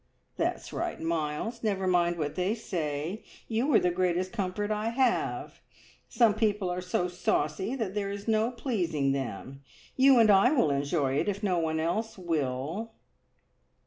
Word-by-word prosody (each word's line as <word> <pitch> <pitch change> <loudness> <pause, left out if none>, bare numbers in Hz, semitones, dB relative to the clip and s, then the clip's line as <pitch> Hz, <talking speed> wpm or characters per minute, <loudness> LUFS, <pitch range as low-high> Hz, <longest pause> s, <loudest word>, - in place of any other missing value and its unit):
"That's - - -2
right, - - -3
Miles; 165 +8 -2
never 195 -4 -1
mind 175 -1 +2
what 150 -2 -2
they 185 +4 0
say! 165 -2 -3 0.2
You 240 +6 0
are - - +8
the 180 - +1
greatest 180 +1 0
comfort 205 0 -2
I 215 +1 0
have. 250 0 0 0.5
Some 230 -4 +4
people 205 -4 0
are 180 +1 -3
so 180 0 -1
saucy 180 - -1
there 205 -4 -2
is 200 +1 -6
no 220 +1 +2
pleasing 175 - -1
them. 135 0 -4 0.3
You 265 0 +6
and 225 -2 +6
I 195 +5 +6
will 200 - +3
enjoy 140 -1 0
it, - - 0
if 200 +1 -4
no 185 -4 +2
one 160 -1 -1
else 220 +8 -2
will." 165 - -2
185 Hz, 155 wpm, -29 LUFS, 160-220 Hz, 0.5 s, are